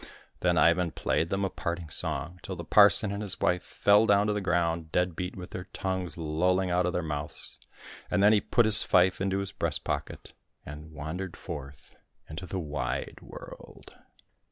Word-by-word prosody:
Then - - +2
Ivan 85 +1 +4
played 80 +1 -1
them 100 +1 0
a - - -1
parting 85 -1 -4
song, 80 +4 -2
till 95 - -6
the 85 - -7
parson 105 +4 +6
and 100 +1 -4
his 100 -3 -1
wife 90 0 +1
fell 105 +4 +3
down 100 0 +4
to 105 - +1
the 105 - -2
ground, 85 -3 0
dead 90 -1 0
beat, 90 +1 -4
with 90 -1 -9
their 90 +1 -7
tongues 95 -2 -3
lolling 90 +4 0
out 90 0 +2
of 90 - -2
their 90 - -1
mouths; 75 -1 -4 0.5
and 100 - +2
then 105 +1 +7
he 105 - +3
put 120 - +2
his 110 0 +4
fife 90 +1 +3
into 95 0 0
his 100 -1 -3
breast - - -2
pocket, - - -5 0.3
and 75 +1 -9
wandered 80 +5 -6
forth 70 -5 -9 0.3
into 80 +4 -7
the 95 - -4
wide 75 -7 -4
world. - - -12
90 Hz, 185 wpm, -28 LUFS, 80-95 Hz, 0.5 s, then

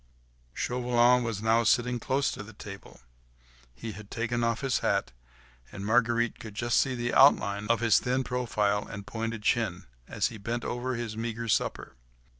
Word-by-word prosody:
Chauvelin 125 0 +3
was 110 -3 -3
now 115 +1 +3
sitting 120 +2 +2
close 135 +4 0
to - - -6
the 105 +2 -11
table; 100 -7 -11 0.7
he 115 - -6
had 105 0 -11
taken 120 0 -2
off 115 -1 0
his 135 -2 +1
hat, 100 -7 0 0.6
and 100 -1 -7
Marguerite 120 +1 +2
could 110 -2 -9
just 120 +2 +2
see 130 -1 +1
the 120 0 -2
outline 100 -7 +4
of 115 0 +2
his 115 -3 +5
thin 130 +1 0
profile 105 -5 0
and 100 0 -8
pointed 115 0 -4
chin, - - 0 0.2
as - - 0
he 115 - -10
bent 120 +4 -3
over 125 +1 -2
his 115 -2 -4
meagre 115 +1 -4
supper. - - -1
115 Hz, 170 wpm, -28 LUFS, 105-120 Hz, 0.7 s, his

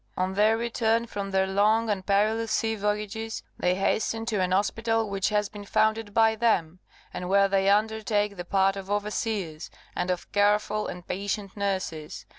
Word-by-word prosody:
On 185 +1 0
their 215 +3 +3
return 230 0 0
from 200 -3 -5
their 190 0 +2
long 210 +4 +2
and 200 -3 -1
perilous 215 +3 +1
sea 225 +1 +1
voyages, 210 +2 -3 0.2
they 180 0 +2
hasten 225 +3 0
to 215 -4 0
an 180 - +1
hospital 225 +3 +1
which 195 -1 -1
has 210 -1 +1
been 205 0 -10
founded 220 +1 +1
by 225 +1 +4
them, 185 -7 +1 0.3
and 180 - -5
where 200 +1 +5
they 195 0 +2
undertake 210 0 +1
the 175 - -5
part 195 +1 +2
of 195 0 -7
overseers, 205 -5 -2 0.3
and 180 +1 -2
of 180 -1 -3
careful 210 +1 +2
and 180 0 -8
patient 200 +1 -3
nurses. 185 -6 -3
205 Hz, 170 wpm, -27 LUFS, 195-220 Hz, 0.3 s, where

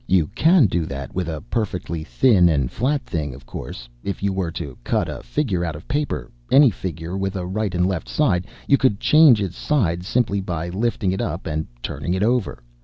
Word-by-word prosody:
You 90 -4 +3
can 165 -3 +5
do 85 -4 0
that 70 -3 -6
with 90 -2 -2
a 80 -1 -4
perfectly 95 -7 -3
thin 95 -2 +4
and 70 -6 +1
flat 135 +1 0
thing, 75 -6 -3
of 70 -1 -14
course. - - -8 0.2
If 100 - -4
you 100 -1 +1
were 95 -3 -1
to 70 -5 -6
cut - - 0
a - - -6
figure 105 - -1
out 85 -3 -3
of 75 - -11
paper, 125 - -2 0.2
any 140 -2 +7
figure 85 -2 -5
with 95 0 -2
a 90 -2 -3
right 95 0 -2
and 90 +1 +2
left 95 -3 -2
side, 95 -12 +1 0.2
you 140 - +4
could 115 -6 +2
change 150 -9 +6
its 90 -3 -5
sides 90 - 0
simply 105 -5 +1
by 85 -2 -3
lifting 100 0 0
it 95 - -2
up - - -3
and 80 0 -2 0.2
turning 90 - -2
it 95 - 0
over. 115 - 0
95 Hz, 210 wpm, -22 LUFS, 85-115 Hz, 0.2 s, any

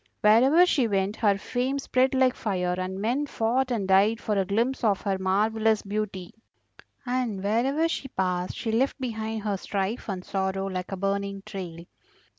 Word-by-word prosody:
Wherever 260 +11 +6
she 275 -9 +2
went 195 0 0
her 205 -3 +3
fame 250 +6 -2
spread 265 -1 +1
like 260 -1 +4
fire, 180 -6 -1
and 185 +1 -4
men 250 +8 0
fought 250 +2 0
and 220 -6 -1
died 200 +4 +4
for 215 - -1
a 195 -1 +1
glimpse 235 +7 0
of 205 -4 +2
her 195 -2 -1
marvellous 215 +3 +1
beauty; 200 -3 -4 0.7
and 245 -6 -2
wherever 260 +10 +1
she 330 -4 -3
passed 180 -6 -2
she 225 - -2
left 260 +6 +1
behind 220 -3 -3
her 205 -2 -1
strife 200 +4 -3
and 185 -2 -4
sorrow 195 0 -1
like 185 -1 -4
a 195 - -3
burning 200 0 -2
trail. 170 -3 -7
210 Hz, 170 wpm, -26 LUFS, 195-245 Hz, 0.7 s, Wherever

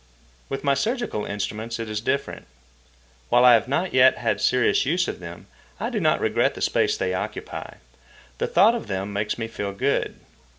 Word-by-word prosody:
With 135 - -4
my 140 -1 +3
surgical 220 - -2
instruments 110 +3 -4
it 115 - -4
is 105 0 -3
different. 140 +5 -3 0.8
While 120 +1 +5
I 125 - +9
have 115 0 +3
not 165 +8 -1
yet 130 0 +6
had 115 -2 -1
serious 125 -1 +3
use 175 +6 +1
for - - -2
them, 85 -1 -10 0.3
I - - -3
do - - -1
not - - +2
regret - - +1
the - - -8
space - - +1
they 95 -1 -1
occupy. 90 - -5 0.6
The - - 0
thought 200 +7 +5
of 235 - -4
them 95 +1 -3
makes 105 +1 -2
me 115 -1 -3
feel 100 -3 -5
good. 100 - -1
115 Hz, 185 wpm, -24 LUFS, 105-140 Hz, 0.8 s, I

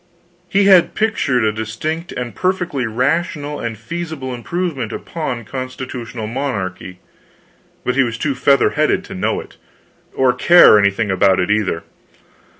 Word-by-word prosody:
He 200 +1 +3
had 190 -3 +5
pictured 150 - +1
a 110 - +2
distinct 115 +11 -4
and 120 -3 -5
perfectly 180 - -1
rational 145 +5 -1
and 115 -1 -4
feasible 155 +1 -5
improvement 135 -1 -3
upon 125 -8 -5
constitutional 130 -2 -6
monarchy, 100 -8 -4 0.9
but 125 - +1
he 135 - +3
was 115 -3 -1
too 140 +3 -1
feather 140 +1 +3
headed - - +1
to - - -9
know - - -1
it, - - -12 0.6
or 130 -1 +3
care 130 -4 +7
anything 100 0 +1
about 95 0 +3
it, 90 +2 0
either. 100 -6 0
125 Hz, 140 wpm, -18 LUFS, 110-155 Hz, 0.9 s, care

